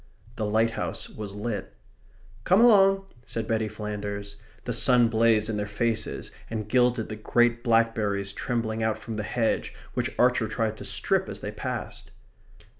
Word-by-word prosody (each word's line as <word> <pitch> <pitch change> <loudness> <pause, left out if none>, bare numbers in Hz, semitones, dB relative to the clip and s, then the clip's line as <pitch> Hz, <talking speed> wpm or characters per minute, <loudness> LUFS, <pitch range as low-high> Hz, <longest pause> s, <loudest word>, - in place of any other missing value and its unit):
The 110 -2 -2
lighthouse 115 +2 0
was 105 -2 -7
lit. 105 +1 -4 0.7
"Come 185 - +4
along," 195 -4 +6 0.2
said 115 -1 -3
Betty 110 -1 0
Flanders. 105 -1 -5 0.3
The - - -2
sun 125 -3 +5
blazed 110 -1 +3
in 110 -2 -2
their 105 0 -2
faces 110 +1 -2 0.2
and 110 -2 -4
gilded 125 -1 +2
the 110 - -5
great 120 +2 +2
blackberries 110 -4 +1
trembling 115 -2 -2
out 110 0 0
from 115 - -7
the 105 - -2
hedge 115 +1 -1 0.2
which - - -2
Archer 125 -2 +3
tried 110 0 -1
to - - -8
strip - - 0
as - - -6
they - - -4
passed. - - -5
110 Hz, 155 wpm, -26 LUFS, 105-120 Hz, 0.7 s, along